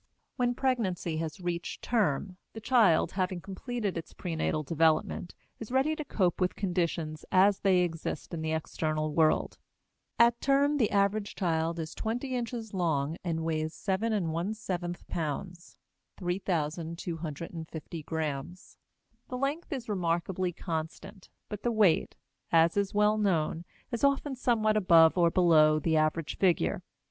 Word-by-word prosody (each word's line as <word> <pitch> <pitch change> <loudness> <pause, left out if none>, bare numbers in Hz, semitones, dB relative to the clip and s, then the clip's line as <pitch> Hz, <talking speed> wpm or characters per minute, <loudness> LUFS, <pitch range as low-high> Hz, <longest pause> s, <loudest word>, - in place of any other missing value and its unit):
When 245 -1 +1
pregnancy 195 -12 -1
has 160 0 -4
reached 175 -1 -4
"term," 190 - 0 0.2
the 220 - -7
child, 220 -8 +4
having 185 -1 -1
completed 200 +1 -4
its 165 - -11
prenatal 160 -3 -2
development, 160 +2 +1 0.2
is 225 +1 -8
ready 270 +4 +2
to 305 - -4
cope 185 - 0
with 180 - +1
conditions 170 -5 -2
as 195 +2 +5
they 190 -2 +3
exist 165 0 -3
in 165 - -3
the 160 0 -2
external 155 -1 -2
world. 155 -1 +2 0.6
At 235 0 +4
term 280 +2 +3
the 225 -7 +2
average 200 +1 +1
child 165 -2 0
is 160 -1 -5
twenty 245 +4 -3
inches 235 -3 -4
long 160 -4 0
and 165 -2 -2
weighs 160 -1 -2
7 205 +3 -1
1/7 175 -1 -3
pounds 170 +3 -5 0.4
(3,250 165 -2 -4
grams). 160 +2 -5 0.5
The 250 - -4
length 280 +7 -2
is 260 -5 -4
remarkably 180 -1 -1
constant; 165 +3 -6 0.2
but 210 -1 -6
the 240 - 0
weight, 210 -7 +3 0.4
as 165 0 +4
is 200 0 0
well 210 +1 +3
known, 170 -4 0 0.3
is 235 +1 -3
often 280 0 +2
somewhat 220 -4 +2
above 165 -5 +6
or 170 -2 +4
below 160 -4 +5
the 160 +1 0
average 155 0 0
figure. 170 - +2
180 Hz, 135 wpm, -29 LUFS, 160-215 Hz, 0.6 s, above